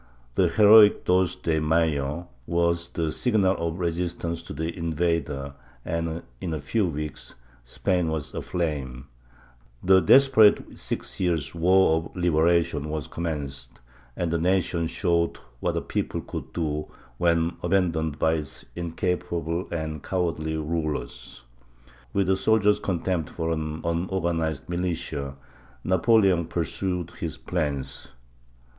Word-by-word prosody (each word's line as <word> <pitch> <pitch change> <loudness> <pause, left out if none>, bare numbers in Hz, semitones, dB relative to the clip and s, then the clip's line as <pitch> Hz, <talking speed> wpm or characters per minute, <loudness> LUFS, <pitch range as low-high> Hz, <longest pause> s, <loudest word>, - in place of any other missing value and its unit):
The 90 - +3
heroic 105 +4 +7
"Dos 90 -1 +3
de 80 -1 0
Mayo" 80 0 0 0.2
was 85 0 +1
the 80 -2 -2
signal 100 -5 +2
of 85 0 -2
resistance 85 -1 -2
to 85 - -11
the 80 +3 -3
invader 80 -4 -1 0.3
and, 85 0 -2 0.2
in 85 -3 -2
a - - -3
few 95 +9 0
weeks, 75 -2 -5 0.3
Spain 90 +7 0
was 80 -3 -3
aflame; 70 -7 -3 0.8
the 95 0 +6
desperate 110 +3 +5
six - - -4
years' 85 -7 0
War 85 0 +4
of 80 0 -6
Libera 85 -1 +3
tion 75 -1 -5
was 75 -2 -3
commenced, 75 -5 -5 0.4
and 85 -2 -1
the 85 - +1
nation 90 -1 +1
showed 85 -1 0 0.2
what - - -1
a - - 0
people - - -3
could - - -7
do 75 -2 -2 0.3
when 85 0 +2
abandoned 85 -5 +1
by 80 0 +2
its 75 -4 -4
incapable 85 0 -2
and 80 -3 -3
cowardly 80 -3 -1
rulers. 75 -5 -4 0.7
With 100 +4 +1
a 95 - +3
soldier's 105 +1 +3
contempt 90 -4 -1
for 80 -1 -3
an 80 -1 -3
unorganized 85 -3 -1
militia, 85 -6 -3 0.5
Napoleon 95 -1 +3
pursued 90 +1 -2
his 85 -2 -5
plans. 75 -6 -3
85 Hz, 125 wpm, -25 LUFS, 80-90 Hz, 0.8 s, heroic